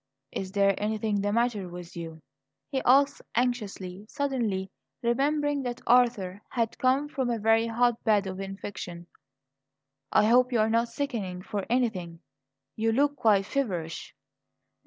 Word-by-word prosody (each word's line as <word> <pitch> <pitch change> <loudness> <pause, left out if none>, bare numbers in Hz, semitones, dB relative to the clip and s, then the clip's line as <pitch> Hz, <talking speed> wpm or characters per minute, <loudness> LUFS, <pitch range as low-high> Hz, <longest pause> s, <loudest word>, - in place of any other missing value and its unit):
"Is 190 0 -5
there 200 -1 +4
anything 210 -1 0
the 205 +1 0
matter 220 -4 0
with 175 +1 -9
you?" 165 -2 -7 0.5
he 265 -2 0
asked 275 +2 +5
anxiously, 210 -5 -2
suddenly 225 -9 -1 0.3
remembering 290 +4 +1
that 245 -2 -4
Arthur 230 -6 +3
had 230 -3 -2
come 265 +3 +2
from 265 -4 -2
a 235 - 0
very 225 +1 +3
hotbed 225 -3 +2
of 190 0 -5
infection. 195 -3 -6 1.1
"I - - +5
hope 250 +3 +4
you're 220 -2 +2
not 230 +1 +2
sickening 225 -9 -4
for 200 -1 -4
anything. 190 -9 -1 0.5
You 225 0 +1
look 285 +5 +2
quite 215 -7 +3
feverish." 180 -11 -3
225 Hz, 135 wpm, -28 LUFS, 195-245 Hz, 1.1 s, asked